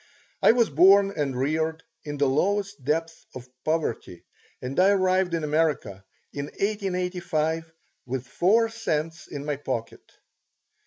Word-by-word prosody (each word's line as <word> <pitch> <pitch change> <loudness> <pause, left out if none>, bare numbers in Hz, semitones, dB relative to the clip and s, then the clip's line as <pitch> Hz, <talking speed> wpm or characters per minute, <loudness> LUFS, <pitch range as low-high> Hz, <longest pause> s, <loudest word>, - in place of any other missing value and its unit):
I - - +7
was 235 -7 +2
born 195 +6 +6
and 140 -4 -2
reared 160 +4 -1 0.2
in 145 -1 -5
the 140 - +2
lowest 200 +5 0
depths 165 +4 -2
of 130 -1 -8 0.2
poverty 155 - -2 0.4
and 130 +5 -3
I 190 +2 +6
arrived 185 -2 +2
in 165 - -2
America 150 -11 0 0.3
in 140 0 -4
1885 180 -4 -2 0.4
with 130 0 -3
four 205 - +2
cents 165 -8 -3
in 145 0 -7
my 150 -2 -2
pocket. 130 -5 -4
160 Hz, 130 wpm, -25 LUFS, 145-185 Hz, 0.4 s, I